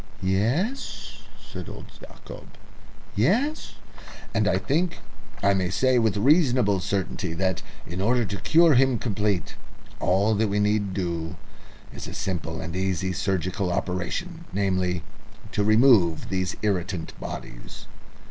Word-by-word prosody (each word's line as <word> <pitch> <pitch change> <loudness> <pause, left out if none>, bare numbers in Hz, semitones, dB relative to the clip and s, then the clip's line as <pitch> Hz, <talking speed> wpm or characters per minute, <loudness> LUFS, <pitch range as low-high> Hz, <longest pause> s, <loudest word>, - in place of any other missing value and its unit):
"Yes?" 125 - -1 0.2
said - - -8
old - - -10
Yacob. - - -12 0.6
"Yes?" 290 +6 +1 0.6
"And - - +2
I - - +3
think 170 +5 0 0.5
I 100 0 +5
may 95 -2 0
say 130 +6 +3
with 110 -4 +1
reasonable 125 - +4
certainty 95 -2 -2
that, 95 -1 0 0.2
in 90 +3 -5
order 120 +3 +2
to 100 0 -4
cure 165 0 +5
him 130 -1 +4
completely, 105 - -1 0.5
all 100 +4 +2
that 110 +1 +2
we 100 +1 +1
need 105 -2 +1
do 85 -2 -2 0.6
is - - -7
a - - -7
simple 85 -3 -3
and 85 +1 -5
easy 95 0 -1
surgical 95 0 -1
operation 95 - -3
namely, 95 -3 0 0.5
to 105 - 0
remove 110 - +4
these 95 -1 -1
irritant 90 -4 -1
bodies." - - -8
100 Hz, 130 wpm, -25 LUFS, 90-120 Hz, 0.6 s, I